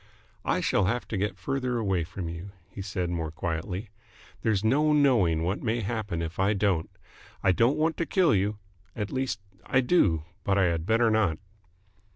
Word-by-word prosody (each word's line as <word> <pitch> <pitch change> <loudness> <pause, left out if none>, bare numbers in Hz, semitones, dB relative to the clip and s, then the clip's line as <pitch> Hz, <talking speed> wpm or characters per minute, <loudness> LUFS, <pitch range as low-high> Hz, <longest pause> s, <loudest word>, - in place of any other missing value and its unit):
"I - - +1
shall 95 - +2
have 120 +6 -1
to - - -2
get 100 -1 -1
further 125 +5 -1
away 95 -6 0
from 90 0 -6
you," 85 +4 -7
he 100 - -8
said 95 -3 -2
more 80 -2 -2
quietly. 85 +6 -4 0.5
"There's 110 -3 +1
no 150 +7 +3
knowing 115 - +3
what 90 +4 -1
may 115 +1 0
happen 100 -5 -2
if 80 +2 -6
I 100 +2 +3
don't. 95 -5 +1 0.5
I 95 - +5
don't 120 - +3
want 160 +1 +1
to 165 - -1
kill 180 -6 +3
you. 100 +2 +1 0.4
At 105 -2 -3
least, 130 -6 -2 0.2
I 130 - +2
do, 100 - +3 0.2
but 100 0 +1
I 100 - +4
had 85 -1 0
better 115 +1 +3
not." 105 -8 +2
100 Hz, 185 wpm, -27 LUFS, 90-120 Hz, 0.5 s, I